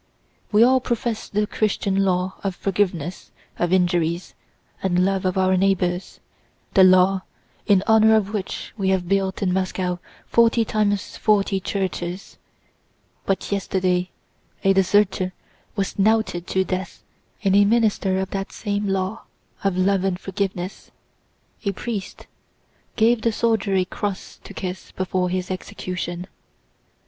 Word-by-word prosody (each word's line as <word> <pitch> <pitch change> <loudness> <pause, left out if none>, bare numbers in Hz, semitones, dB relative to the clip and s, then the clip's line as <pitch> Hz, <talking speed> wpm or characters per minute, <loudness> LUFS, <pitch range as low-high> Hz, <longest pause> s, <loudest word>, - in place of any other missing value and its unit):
We 215 +1 +6
all 260 +2 +5
profess 235 -2 -2
the 210 +1 +1
Christian 205 -2 -1
law 185 -1 +1
of 195 -2 -2
forgiveness 180 -4 -2 0.3
of 175 0 +1
injuries 175 -2 +1 0.5
and 180 -1 +2
love 195 -1 0
of 185 0 0
our 185 0 +3
neighbors, 185 -1 0 0.5
the 190 - +7
law 185 +1 +5 0.5
in 200 -3 +4
honor 220 0 +6
of 210 -1 0
which 200 -3 -4
we 195 -3 0
have 185 -2 +1
built 195 +1 0
in 180 -2 +1
Moscow 185 -1 -1 0.3
forty 230 0 +3
times 205 -2 -1
forty 200 -2 +2
churches—but 190 0 -6
yesterday 185 -2 0 0.5
a 195 - +5
deserter 190 -1 +2 0.4
was 195 -1 -2
knouted 215 -4 +2
to 190 - +1
death 185 0 -5 0.4
and 195 -1 +3
a 205 - +7
minister 205 -3 +2
of 190 0 -2
that 195 0 -3
same 205 -1 -2
law 195 +2 -2 0.4
of 195 -2 +1
love 190 0 +2
and 190 -2 0
forgiveness, 190 -1 -4 0.7
a 200 -2 0
priest, 205 -1 -5 0.7
gave 225 +1 +3
the 230 - +2
soldier 220 -3 +1
a 185 -1 +2
cross 200 +1 -5
to - - -11
kiss 185 0 -5
before 185 -1 -1
his 185 0 -2
execution." 180 -2 -5
195 Hz, 135 wpm, -22 LUFS, 185-205 Hz, 0.7 s, the